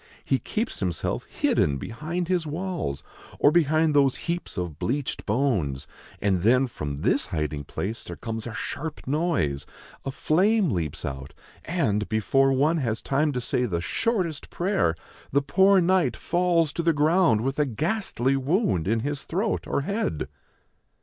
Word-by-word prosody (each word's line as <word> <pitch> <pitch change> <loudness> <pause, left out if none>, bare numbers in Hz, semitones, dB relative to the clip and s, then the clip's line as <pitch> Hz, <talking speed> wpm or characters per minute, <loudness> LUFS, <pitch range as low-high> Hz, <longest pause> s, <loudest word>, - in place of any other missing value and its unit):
He 135 - +2
keeps 225 +3 -3
himself 90 -4 -2
hidden 70 -2 +1
behind 155 - -4
his 175 -3 0
walls 170 - -3 0.3
or 145 - +5
behind 155 -1 +3
those 140 -2 +4
heaps 170 -7 -3
of 85 -5 -4
bleached 140 +2 -2
bones; 100 - 0 0.3
and 95 -3 +1
then 125 +6 +4
from 75 - -5
this - - +2
hiding 75 -2 -3
place 110 +10 -4
there - - -7
comes 115 0 -5
a 115 - -6
sharp 155 0 -5
noise, 135 - 0 0.4
a - - -3
flame 185 - +2
leaps 80 -7 -3
out, 65 +1 -6 0.3
and, 105 - 0
before 135 +5 +3
one 145 +5 +3
has 120 -6 -1
time 150 +2 +1
to 125 - -1
say 125 +1 0
the 85 -5 -1
shortest 180 - -1
prayer, 175 - +1 0.4
the 140 +1 +2
poor 190 +7 +5
knight 185 0 +2
falls 170 -3 +1
to - - -1
the 165 0 +3
ground 155 - +3
with 135 +4 -2
a 150 - +4
ghastly 140 - 0
wound 135 - +1
in 115 +2 +1
his 145 +2 -2
throat 200 +6 -1
or - - 0
head." 200 - -2
140 Hz, 155 wpm, -26 LUFS, 110-170 Hz, 0.4 s, or